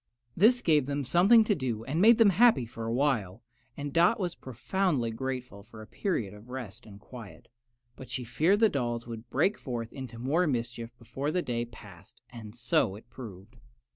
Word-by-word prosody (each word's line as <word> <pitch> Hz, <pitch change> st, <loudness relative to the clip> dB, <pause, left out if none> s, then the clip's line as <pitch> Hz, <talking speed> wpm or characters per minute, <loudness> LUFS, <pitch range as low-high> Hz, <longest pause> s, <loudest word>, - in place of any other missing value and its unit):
This 245 Hz, +6 st, +4 dB
gave 150 Hz, -5 st, +3 dB
them 145 Hz, 0 st, -2 dB
something 185 Hz, -, +5 dB
to 215 Hz, -, +1 dB
do 125 Hz, -, -3 dB
and 150 Hz, +8 st, -1 dB
made 225 Hz, +2 st, +7 dB
them 220 Hz, -4 st, +6 dB
happy 210 Hz, -, +4 dB
for 115 Hz, 0 st, -8 dB
a -, -, -2 dB
while, 120 Hz, -6 st, 0 dB, 0.3 s
and 145 Hz, -1 st, -5 dB
Dot 175 Hz, +7 st, +4 dB
was 180 Hz, -3 st, -2 dB
profoundly 130 Hz, 0 st, -2 dB
grateful 125 Hz, -3 st, -5 dB
for 110 Hz, +2 st, -14 dB
a 110 Hz, -, -9 dB
period 115 Hz, -, -3 dB
of 105 Hz, +4 st, -14 dB
rest 120 Hz, -4 st, -8 dB
and 100 Hz, -1 st, -12 dB
quiet; 115 Hz, -1 st, -12 dB, 0.5 s
but 130 Hz, -, -11 dB
she 130 Hz, -, -4 dB
feared 160 Hz, -, +1 dB
the 225 Hz, -, +7 dB
dolls 120 Hz, -, -2 dB
would 115 Hz, 0 st, -9 dB
break 190 Hz, +12 st, +1 dB
forth 120 Hz, -4 st, -5 dB
into 130 Hz, -3 st, -8 dB
more 150 Hz, +9 st, +1 dB
mischief 120 Hz, -3 st, -3 dB
before 135 Hz, +5 st, -4 dB
the 180 Hz, +3 st, -1 dB
day 120 Hz, -1 st, -2 dB
passed, 100 Hz, -7 st, -15 dB
and 110 Hz, -3 st, -10 dB
so 120 Hz, -5 st, +1 dB
it 115 Hz, +3 st, -15 dB
proved. 110 Hz, -2 st, -11 dB
125 Hz, 190 wpm, -29 LUFS, 115-160 Hz, 0.5 s, made